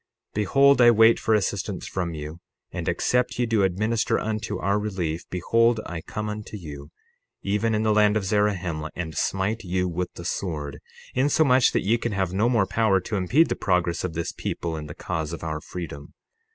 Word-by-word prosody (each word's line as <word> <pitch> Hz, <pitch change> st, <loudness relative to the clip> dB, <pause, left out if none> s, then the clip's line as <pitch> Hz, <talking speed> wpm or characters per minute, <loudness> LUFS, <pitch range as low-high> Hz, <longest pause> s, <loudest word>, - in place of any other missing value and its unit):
60:30 -, -, -52 dB
Behold, 135 Hz, +7 st, +4 dB
I 120 Hz, -, +8 dB
wait 115 Hz, 0 st, +6 dB
for 110 Hz, -, +2 dB
assistance 100 Hz, -1 st, -2 dB
from 85 Hz, -3 st, -3 dB
you; 75 Hz, +2 st, -7 dB, 0.3 s
and, -, -, -3 dB
except 125 Hz, 0 st, 0 dB
ye 120 Hz, -, +2 dB
do 115 Hz, -3 st, +1 dB
administer 105 Hz, +4 st, +1 dB
unto 110 Hz, 0 st, -3 dB
our 100 Hz, +1 st, +1 dB
relief, 90 Hz, -6 st, -3 dB
behold, 115 Hz, +6 st, +2 dB
I 85 Hz, -2 st, -5 dB
come 105 Hz, +6 st, -5 dB
unto 105 Hz, 0 st, -6 dB
you, 75 Hz, -5 st, -9 dB, 0.5 s
even 105 Hz, +3 st, +1 dB
in 110 Hz, -, 0 dB
the 110 Hz, -1 st, +3 dB
land 105 Hz, 0 st, +4 dB
of 100 Hz, -, -2 dB
Zarahemla, 95 Hz, -6 st, 0 dB
and 80 Hz, -3 st, -5 dB
smite 95 Hz, -, -1 dB
you 90 Hz, 0 st, -1 dB
with 90 Hz, +1 st, -3 dB
the 85 Hz, -, -8 dB
sword, 75 Hz, -8 st, -3 dB, 0.3 s
insomuch 130 Hz, -1 st, +4 dB
that -, -, +1 dB
ye 115 Hz, +3 st, +2 dB
can 120 Hz, -2 st, -2 dB
have 95 Hz, -2 st, -1 dB
no 105 Hz, +5 st, +2 dB
more 115 Hz, -5 st, +3 dB
power 100 Hz, 0 st, +2 dB
to 105 Hz, -, -4 dB
impede 110 Hz, -, +3 dB
the -, -, 0 dB
progress 90 Hz, -3 st, 0 dB
of 90 Hz, -3 st, -3 dB
this 85 Hz, +1 st, -3 dB
people 85 Hz, -1 st, -4 dB
in 75 Hz, -1 st, -6 dB
the 75 Hz, -, -9 dB
cause 80 Hz, -4 st, -3 dB
of 85 Hz, -, -7 dB
our 80 Hz, -1 st, -3 dB
freedom. 75 Hz, -5 st, -8 dB
100 Hz, 195 wpm, -25 LUFS, 85-110 Hz, 0.5 s, I